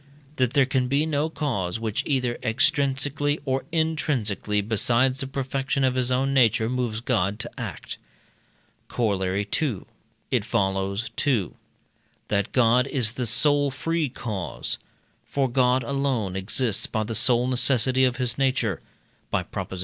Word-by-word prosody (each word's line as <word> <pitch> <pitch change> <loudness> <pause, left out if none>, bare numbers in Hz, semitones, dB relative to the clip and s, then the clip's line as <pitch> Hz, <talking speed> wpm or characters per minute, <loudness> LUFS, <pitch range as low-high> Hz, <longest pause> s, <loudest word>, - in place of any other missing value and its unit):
That 130 -1 +1
there 140 -3 +5
can 130 -1 0
be 140 +4 +1
no 155 0 0
cause 115 - -2
which, 110 -2 -1
either 125 -4 0
extrinsically 145 +3 +1
or 135 -1 -1
intrinsically, 145 - 0
besides 120 +5 +1
the 135 - -1
perfection 135 0 -2
of 130 -1 +3
his 130 -1 0
own 135 +2 +1
nature, 115 -4 +3
moves 120 -3 -2
God 105 -5 0
to 120 +1 -5
act. 110 - -6 0.9
Corollary 100 -3 -1
II. 130 -11 -1 0.5
It - - +2
follows: 100 +3 -1
2. 120 - +1 0.8
That 100 -1 0
God 125 +1 +4
is 125 -6 +1
the 125 -1 -3
sole 145 +5 +3
free 160 +3 -1
cause. 105 -7 -4 0.4
For 140 -1 0
God 125 0 +2
alone 130 -7 -1
exists 105 +3 0
by 110 - -1
the 110 +2 -4
sole 120 +2 +3
necessity 130 0 +3
of 125 -1 +2
his 125 0 -2
nature 130 -8 +1 0.5
(by - - 0
Prop. - - -6
xi. 95 - -5
125 Hz, 145 wpm, -25 LUFS, 110-135 Hz, 0.9 s, there